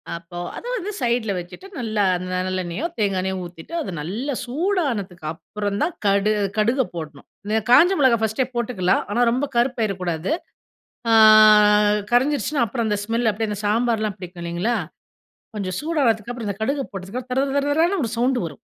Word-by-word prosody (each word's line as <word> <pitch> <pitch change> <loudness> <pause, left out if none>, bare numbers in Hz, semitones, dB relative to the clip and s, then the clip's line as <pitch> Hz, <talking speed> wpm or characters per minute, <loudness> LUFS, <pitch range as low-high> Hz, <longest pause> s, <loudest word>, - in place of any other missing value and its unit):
அப்போ, 170 +1 -10 0.2
அத - - -8
வந்து 420 -1 -4
சைடுல 235 -4 0
வச்சுட்டு. 180 - -10
நல்லா 215 -3 0
அந்த 180 +1 -6 0.2
நல்லெண்ணயோ, 185 - -3
தேங்காய் 200 -3 +1
எண்ணெயோ, 190 0 -2
ஊத்திட்டு, 175 - -12
அது 235 - -5
நல்லா 225 - -3
சூடானதுக்கு 250 - -2
அப்புறம் 205 +4 -4
தான் 345 - -2
கடு 200 +1 +3 0.3
கடுக 235 +5 +2
போடணும். 155 -4 -8 0.2
இந்த 215 +2 +1
காஞ்ச 340 +9 +7
மிளகாய் 250 -5 +4
ஃபர்ஸ்ட்டே 220 +4 +1
போட்டுக்கலாம். 220 -6 +1
ஆனா 235 - +1
ரொம்ப 260 +4 0
கருப்பாயிரகூடாது. 200 - 0 0.8
அ - - +5 1.0
கரைஞ்சிருச்சுனா, 280 +2 +2
அப்புறம் 230 +1 -2
அந்த 210 - 0
ஸ்மெல் 230 +1 +1
அப்படியே 220 +1 -3
அந்த 205 - -4
சாம்பார்லாம் 220 -1 0
பிடிக்கும் 180 -1 -9
இல்லைங்களா, 175 +8 -1 0.8
கொஞ்சம் 185 -3 -3
சூடானதுக்கு 245 -9 0
அப்புறம், 235 -3 -5
இந்த 200 - -4
கடுக 275 +4 0
போட்டதுக்கு 200 +6 -6
தர, 255 - -2
தர, - - -3
தர, 280 - -2
தரன்னு 350 +2 +2
ஒரு 225 - -2
சவுண்டு 250 +2 +2
வரும். 150 -4 -8
220 Hz, 160 wpm, -22 LUFS, 190-250 Hz, 1.0 s, காஞ்ச